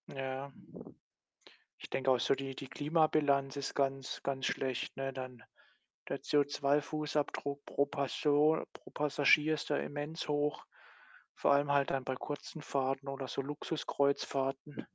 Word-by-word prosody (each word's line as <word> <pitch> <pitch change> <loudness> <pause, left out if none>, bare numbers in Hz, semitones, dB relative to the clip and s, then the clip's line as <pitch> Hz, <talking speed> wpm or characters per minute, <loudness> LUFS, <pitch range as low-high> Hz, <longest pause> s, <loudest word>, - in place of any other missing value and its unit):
Ja. 135 +1 -4 1.3
Ich - - -10
denke 130 0 +1
auch 125 - +3
so - - +3
die 135 -1 -5
die 135 0 -7
Klimabilanz 145 -3 +2
ist 140 - -3
ganz, 135 -1 -1
ganz 135 -1 -1
schlecht, 130 -1 -2
ne? 135 0 -2
Dann 130 -3 -7 0.7
der - - -2
CO₂-Fußabdruck 145 0 0
pro 140 - +1
Person 145 +2 +2
pro - - -14
Passagier 150 +1 +4
ist 150 - -5
da 145 - +3
immens 145 +2 -4
hoch, 145 0 0 0.7
vor - - +3
allem 140 0 +3
halt 140 -1 +3
dann 135 -1 0
bei 130 - -1
kurzen 150 +3 -6
Fahrten 135 0 -1
oder 135 -1 -4
so 135 - -2
Luxuskreuzfahrten. 140 -1 -1
140 Hz, 135 wpm, -34 LUFS, 135-145 Hz, 1.3 s, Passagier